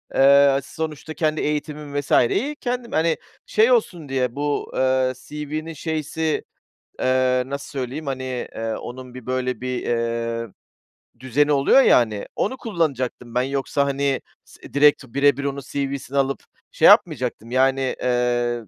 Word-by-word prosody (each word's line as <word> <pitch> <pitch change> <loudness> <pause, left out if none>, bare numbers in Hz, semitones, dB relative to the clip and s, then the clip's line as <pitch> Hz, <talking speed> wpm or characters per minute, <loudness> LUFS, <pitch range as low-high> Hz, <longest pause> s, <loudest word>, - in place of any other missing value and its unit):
Eee, 140 0 +6
sonuçta 155 +1 -6
kendi 155 -1 0
eğitimim 150 -1 -3
vesaireyi 145 - +1
kendim, 245 -3 -4
hani, 160 0 +1 0.3
şey 455 +3 +3
olsun 175 - +1
diye, 125 -2 -1
bu, 145 0 -2
ııı, 130 0 +2
CV'nin 155 +2 -5
şeysi, 155 0 -2 0.6
eee, 130 0 +2
nasıl 140 +1 -6
söyleyeyim, 140 +2 -5
hani, 130 -1 -3 0.3
eee, 115 0 -3
onun 125 0 -8
bir 125 -3 -10
böyle 125 -2 -2
bir, 125 -1 -2
eee, 115 0 -2 0.7
düzeni 140 +4 +1
oluyor 140 - +5
ya, - - +6
hani, 110 -4 0
onu 260 +6 -1
kullanacaktım 135 - -2
ben. 125 - +3
Yoksa, 140 +1 0
hani, 140 -1 0 0.2
s - - -15
direkt 145 0 +5
birebir 140 +2 +2
onun 140 0 -2
CV'sini 140 -1 -3
alıp 135 0 0 0.3
şey - - +1
yapmayacaktım, 115 +3 +3
yani. 135 0 +2
Iıı, 120 -2 0
140 Hz, 140 wpm, -22 LUFS, 125-150 Hz, 0.7 s, Eee